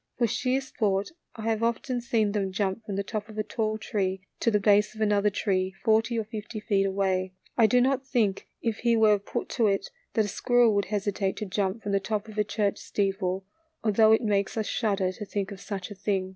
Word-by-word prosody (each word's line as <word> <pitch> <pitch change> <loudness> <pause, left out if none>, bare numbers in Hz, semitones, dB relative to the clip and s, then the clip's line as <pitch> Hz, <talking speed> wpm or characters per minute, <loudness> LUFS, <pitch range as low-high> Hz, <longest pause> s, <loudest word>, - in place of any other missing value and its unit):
For 240 - +3
sheer 250 +4 0
sport 205 -6 -1 0.2
I 220 - -7
have 225 -1 0
often 235 +2 0
seen 225 -3 +1
them 200 -2 -1
jump 195 +2 -1
from 205 -2 -5
the 200 - -1
top 210 +1 -4
of 215 - -10
a 215 - 0
tall 215 0 -1
tree 190 -3 -2 0.2
to - - +2
the 210 -2 +2
base 205 +1 +3
of 220 - -7
another 210 -1 +3
tree, 190 -2 -1
forty 225 +1 +3
or 225 - 0
fifty 215 0 -6
feet 200 -2 +1
away, 190 -1 0 0.2
I 225 -2 +5
do 245 +4 +4
not 265 +1 +1
think 220 -7 0 0.2
if 225 -2 0
he 235 -1 +2
were 215 -2 +5
put 200 - -4
to 230 -4 +2
it 195 -1 0 0.2
that 220 - +3
a - - -3
squirrel 240 +2 +3
would 200 -1 +1
hesitate 200 -1 -1
to 215 - -3
jump 195 +2 -2
from 205 - -2
the 200 - +3
top 210 +2 -3
of 215 -1 -6
a - - +4
church 205 -1 -1
steeple, 195 -1 -1 0.4
although 220 0 +5
it 220 +2 +4
makes 200 -1 0
us 220 - 0
shudder 200 -5 0
to 200 - -7
think 200 0 -3
of 195 -1 -8
such 195 -1 -5
a - - -4
thing. 195 -1 -1
210 Hz, 225 wpm, -27 LUFS, 195-225 Hz, 0.4 s, I